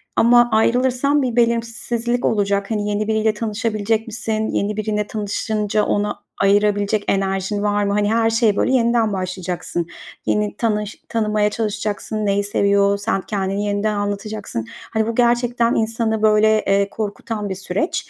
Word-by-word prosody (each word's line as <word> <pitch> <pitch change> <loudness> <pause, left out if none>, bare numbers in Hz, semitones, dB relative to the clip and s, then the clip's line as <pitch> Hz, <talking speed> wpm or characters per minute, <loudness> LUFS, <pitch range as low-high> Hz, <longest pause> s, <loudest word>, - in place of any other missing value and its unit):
ama 240 +1 +5
ayrılırsan 255 +5 +2
bir 250 -3 -1
belirsizlik 235 0 0
olacak. 200 -1 0
Hani, 210 -1 -1
yeni 210 +1 -1
biriyle 220 0 +1
tanışabilecek 220 0 -1
misin? 220 -1 -2
Yeni 205 +1 -1
biriyle 210 -1 -1
tanışınca, 210 0 -1
ona 205 0 -1 0.2
ayırabilecek 205 +1 +2
enerjin 195 +1 0
var 205 0 +1
mı? 200 0 0
Hani, 205 +1 +1
her 225 0 +3
şeye, 225 -2 +2
böyle, 260 - +1
yeniden 235 -3 +2
başlayacaksın. 180 -2 -3 0.4
Yeni 210 -1 0
tanış 210 -2 -2
tanımaya 215 -2 +1
çalışacaksın, 215 0 -3
neyi 200 0 +1
seviyor, 200 0 +2
sen 200 -1 -1
kendini 195 0 -2
yeniden 205 +1 0
anlatacaksın. 205 - -4 0.3
Hani, 220 -1 +1
bu 230 - -2
gerçekten 240 0 +2
insanı, 220 -1 0
böyle, 215 0 +4 0.2
eee, 200 0 +2
korkutan 210 0 -4
bir 190 - -3
süreç. 195 - -3
210 Hz, 145 wpm, -20 LUFS, 205-225 Hz, 0.4 s, ama